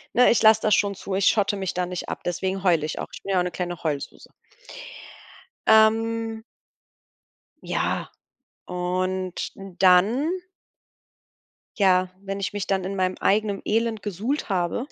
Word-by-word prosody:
Ne, 250 - +6
ich 235 - +3
lass 220 0 +7
das 215 -2 +3
schon 200 -1 +1
zu. 190 0 -5
Ich 195 - +1
schotte 205 -2 +3
mich 190 -2 -3
da 180 0 -1
nicht 180 -1 -5
ab, - - -5
deswegen 190 +2 -2
heul 170 -5 +3
ich 155 - -4
auch. - - -4
Ich - - -10
bin 195 - -4
ja 185 - +3
auch - - +2
'ne 180 - -2
kleine 175 -1 -4
Heulsuse. 145 -3 -4 1.4
Ähm 225 +1 +3 1.2
ja, - - -1 0.6
und 185 +1 -2
dann 195 - +3 1.5
ja, 185 -2 +3
wenn 195 0 -5
ich 195 - -3
mich 205 -2 -3
dann 190 -1 0
in 195 +2 -4
meinem 185 -1 0
eigenem 205 -1 +1
Elend 225 -1 0
gesuhlt 215 - -3
habe, 180 +6 -1
195 Hz, 155 wpm, -24 LUFS, 180-220 Hz, 1.5 s, lass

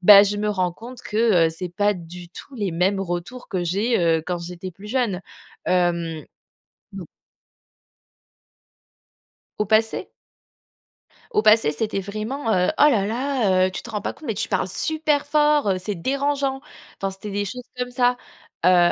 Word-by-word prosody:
bah, 200 +2 +10
je 205 0 0
me 210 0 0
rends 185 -4 0
compte 240 +5 -11
que, 210 -6 +3
heu, - - -5
c'est 175 +3 -5
pas 205 +4 +1
du 175 -1 -10
tout 275 - -11
les 205 -6 -2
mêmes 190 +4 +1
retours 175 +7 -5
que 180 -2 -2
j'ai, 200 +7 +1
heu, 165 -2 +2
quand 180 -1 -1
j'étais 175 +2 -7
plus 195 +4 -12
jeune. 225 -6 0 0.5
Hem. 170 -3 0 0.7
Non. - - -7 2.5
Au 210 - 0
passé? 220 +2 +1 1.2
Au - - +3
passé 215 -7 +5
c'était 200 +5 -2
vraiment, 215 +6 -3
heu: 180 0 +3
«Oh - - +2
là 205 -8 +2
là, 230 -6 +1
heu, - - -5
tu - - -5
te - - -11
rends 210 -2 -3
pas - - -2
compte 310 - -14
mais 225 - 0
tu 200 - -3
parles 190 -2 0
super 305 - 0
fort, 295 -5 +3
heu, 190 - +2
c'est 200 +2 -3
dérangeant!» 275 +5 -1 0.4
Enfin, 195 - -2
c'était 195 +2 -8
des 205 +1 -1
choses 250 +6 -6
comme 250 0 -2
ça! 245 0 +2 0.5
Heu, 175 -1 +6
205 Hz, 170 wpm, -23 LUFS, 180-245 Hz, 2.5 s, bah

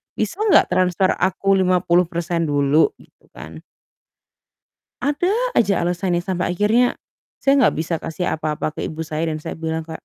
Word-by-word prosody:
"Bisa 215 - -3
nggak 405 - +5
transfer 185 +1 +2
aku 195 +1 +1
50% 175 -2 +1
dulu?" 145 +1 +2
gitu - - -24
kan - - -10 1.4
ada 295 +7 0 0.2
aja 205 -4 +2
alasannya 175 0 -1
sampai 180 0 -2
akhirnya, 220 +7 +2 0.5
saya 275 0 +3
nggak - - +3
bisa 165 +1 -2
kasih 165 +2 -3
apa-apa 155 0 -3
ke - - -4
ibu 160 - -6
saya, 160 0 -2
dan 155 - -5
saya - - -6
bilang 160 0 -3
kayak, 160 0 -9
175 Hz, 150 wpm, -20 LUFS, 160-190 Hz, 1.4 s, nggak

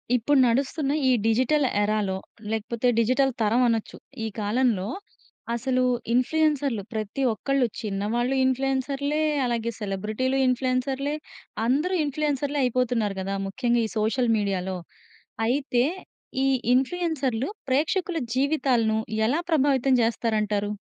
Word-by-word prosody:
ఇప్పుడు 270 +4 +3
నడుస్తున్న 270 +4 0 0.2
ఈ - - +5
డిజిటల్ 255 +6 +3 0.2
ఎరాలో 205 -2 0 0.4
లేకపోతే, 225 +2 -1
డిజిటల్ 255 +4 +3
తరం 220 +3 +3
అనొచ్చు. 225 -2 -1 0.3
ఈ - - -1
కాలంలో 210 -2 +1 0.7
అసలు 255 +2 0 0.3
ఇన్ఫ్లుయెన్సర్‌లు, 280 -3 +1
ప్రతి 215 +4 -3
ఒక్కళ్ళు 270 +5 0 0.2
చిన్నవాళ్ళు 220 +5 -1
ఇన్ఫ్లుయెన్సర్‌లే, 270 +3 0 0.2
అలాగే 235 -1 -1
సెలబ్రిటీలు 215 +6 -1
ఇన్ఫ్లుయెన్సర్‌లే, 260 +2 0 0.5
అందరూ 295 +10 +1
ఇన్ఫ్లుయెన్సర్‌లే, 290 0 -1
అయిపోతున్నారు 245 -4 0
కదా! 195 +1 -3
ముఖ్యంగా 240 +3 +1
ఈ - - -4
సోషల్ 230 +3 +1
మీడియాలో 190 -2 -1 0.7
అయితే, 250 -1 +1 0.6
ఈ - - +3 0.3
ఇన్ఫ్లుయెన్సర్‌లు 270 -3 0 0.2
ప్రేక్షకుల 330 +6 +1 0.2
జీవితాలను 260 -5 +2 0.3
ఎలా 295 +8 +1
ప్రభావితం 275 -3 +3
చేస్తారంటారు? 215 -3 0
250 Hz, 105 wpm, -25 LUFS, 220-275 Hz, 0.7 s, ఈ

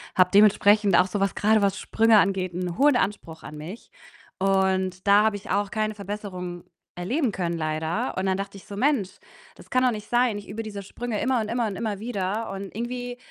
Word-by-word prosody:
habe 180 -1 +4
dementsprechend 205 -1 +5
auch 185 - +4
so 200 +2 -3
was, 195 - 0
grade, 215 0 +3
was 195 -1 +1
Sprünge 225 -1 +3
angeht, 190 -2 0
'n 180 -1 -4
hohen 285 -2 +4
Anspruch 170 -7 -3
an 150 - -9
mich. 175 +9 -9 0.5
Und 190 -1 +1
da 205 +1 +6
habe 220 -2 +2
ich 205 - -13
auch 200 0 0
keine 215 -1 -1
Verbesserung 190 -4 -6 0.3
erleben 235 - -1
können, 170 -3 -2
leider. 155 +1 -2
Und 190 - -1
dann 190 0 +1
dachte 195 0 -5
ich - - -14
so: 200 - -7
„Mensch, 255 -7 +1 0.5
das - - -16
kann 255 - +3
doch 255 - +4
nicht 210 -2 -7
sein. 240 -3 +2
Ich 205 - -9
übe 220 +3 -4
diese 205 -2 -7
Sprünge 230 +2 -4
immer 255 -3 +1
und 215 - -4
immer 235 0 0
und 200 - -4
immer 210 0 -3
wieder.“ 210 -1 -3
Und 195 0 -5
irgendwie 245 +1 -4
200 Hz, 210 wpm, -25 LUFS, 185-220 Hz, 0.5 s, da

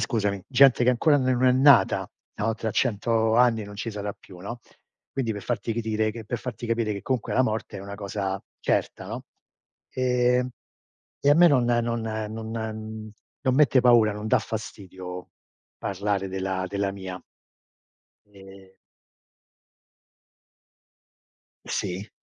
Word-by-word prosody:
scusami, 100 -5 -1
gente 135 -2 +6
che 125 - +5
ancora 145 +5 +3
ne 130 -1 +1
non 130 +1 +2
è 125 - +6
nata, 135 +2 +5 0.3
no 110 +1 0
tra 110 -1 -3
100 115 -1 +1
anni 120 -3 +4
non 105 0 -10
ci 110 - -4
sarà 105 -1 -4
più, 90 - -15
no, 110 +7 -6 0.5
quindi 130 -4 -1
per 105 -1 -7
farti 120 -1 -2
ridire 110 -1 0
per 120 +4 -3
farti 120 -1 -6
capire 115 -2 0
che, 100 - -6
comunque, 130 -4 -2
la 130 - +4
morte 110 -3 -3
è - - -8
una 100 +1 -7
cosa 100 -1 -3 0.2
certa, - - -1
no? - - -6 0.7
Ehm, 125 0 +2 0.7
e 140 - +3
a 145 - +7
me 175 +2 +7
non 130 -5 +3
non 120 -1 +1
non 110 0 -4
mhmm, 110 -1 -5 0.3
non 130 -2 +2
mette 140 -2 +5
paura, 120 -4 +5
non 105 +1 -6
dà - - +4
fastidio 95 -4 -7 0.5
parlare 100 0 -2
della 95 0 -2
della 100 0 -1
mia. 95 -1 -7 1.1
Ehm. 95 0 -14 2.9
Sì. 95 +4 -3
110 Hz, 145 wpm, -25 LUFS, 100-125 Hz, 2.9 s, a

